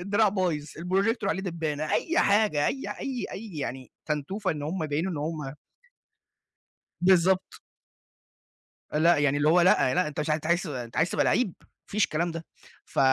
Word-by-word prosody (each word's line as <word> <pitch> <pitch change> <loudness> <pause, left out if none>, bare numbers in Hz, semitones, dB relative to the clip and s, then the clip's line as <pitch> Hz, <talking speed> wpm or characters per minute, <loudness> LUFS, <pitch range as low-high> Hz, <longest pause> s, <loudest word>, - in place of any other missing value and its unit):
الدراع 205 +3 +2
بايظ، 180 -7 -1
الprojector 190 - -1
عليه 190 - 0
دبانة، 155 -4 -3
أي 335 +2 +1
حاجة 200 -8 +3
أي 270 - -2
ح - - -6
أي 260 -3 -3
أي 215 +1 -7
يعني 130 -2 -5 0.2
تنتوفة 155 +7 -2
إن 150 -2 -4
هم 160 +4 -3
يبينوا 155 +5 -1
إن - - -4
هم 150 -2 -4 1.5
بالضبط. 185 +1 +3 1.3
لأ، 165 +3 +4
يعني 145 -1 +2
اللي 145 +1 +2
هو 175 +3 +5
لأ، 170 -7 +4
لأ 180 - +2
أنتَ 150 - -5
مش 150 - -2
ع - - +4
أنتَ 155 0 -4
عايز 170 +1 +2
ت - - -6
أنتَ 125 -6 -6
عايز 160 +3 +2
تبقى - - +1
لعِّيب، 225 -8 +1
ما - - -24 0.2
فيش 205 -1 +1
الكلام 170 +1 -1
ده. 165 0 -6 0.4
فَ - - -9
170 Hz, 185 wpm, -27 LUFS, 150-190 Hz, 1.5 s, هو